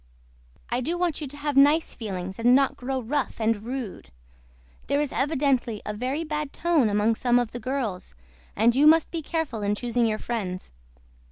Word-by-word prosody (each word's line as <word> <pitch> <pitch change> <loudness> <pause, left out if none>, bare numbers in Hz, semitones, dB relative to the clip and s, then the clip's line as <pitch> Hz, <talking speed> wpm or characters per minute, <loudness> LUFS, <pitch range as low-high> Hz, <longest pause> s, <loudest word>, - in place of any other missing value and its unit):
I 240 +1 0
DO 330 +7 -2
WANT 345 -3 -1
YOU 295 - -4
TO 285 +2 -10
HAVE 290 -1 -2
NICE 295 +4 +5
FEELINGS 190 -3 -5
AND 245 +2 +5
NOT 275 0 +3
GROW 260 +1 -3
ROUGH 275 +3 -2
AND 220 -1 +1
RUDE. 235 - -6 0.8
THERE 280 - +1
IS 295 -2 -1
EVIDENTLY 270 -6 0
A 210 - -3
VERY 255 +8 -2
BAD 300 -2 -3
TONE 320 -9 +2
AMONG 210 +2 +2
SOME 245 +1 +2
OF 245 -2 0
THE 240 - -6
GIRLS 230 - -3 0.4
AND 230 +3 +3
YOU 290 +3 +5
MUST 320 +1 +5
BE 330 - -3
CAREFUL 305 -8 -3
IN 205 0 0
CHOOSING 240 +1 0
YOUR 215 -1 0
FRIENDS. 195 - -4
250 Hz, 185 wpm, -25 LUFS, 220-290 Hz, 0.8 s, NICE